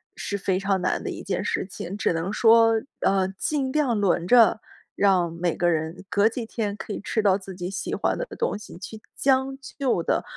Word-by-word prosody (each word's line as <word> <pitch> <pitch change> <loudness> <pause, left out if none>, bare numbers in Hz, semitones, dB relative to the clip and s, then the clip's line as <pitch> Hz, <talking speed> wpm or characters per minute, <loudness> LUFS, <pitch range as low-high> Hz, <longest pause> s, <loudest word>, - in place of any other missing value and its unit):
是 200 - -4
非 190 -1 0
常 195 -1 0
难 185 - -1
的 - - -3
一 - - -7
件 185 -2 -3
事 - - -1
情。 185 0 -6
只 210 - 0
能 165 +5 -2
说， 225 0 +5 0.2
呃， 190 -1 +2
尽 275 0 -1
量 275 -5 +1
轮 185 -4 +1
着， 230 0 +6 0.4
让 185 -4 +3
每 170 0 -1
个 175 - +2
人 165 +2 -2
隔 205 +1 +3
几 230 0 -5
天 215 -3 -3
可 210 - -8
以 - - -4
吃 220 - -1
到 195 -2 +4
自 190 -1 -10
己 180 0 -5
喜 190 - -3
欢 - - 0
的 - - -3
东 475 - 0
西， 210 - -11
去 215 +4 -9
将 270 0 +1 0.2
就 250 -11 +1
地 - - 0
200 Hz, 225 characters per minute, -25 LUFS, 185-230 Hz, 0.4 s, 着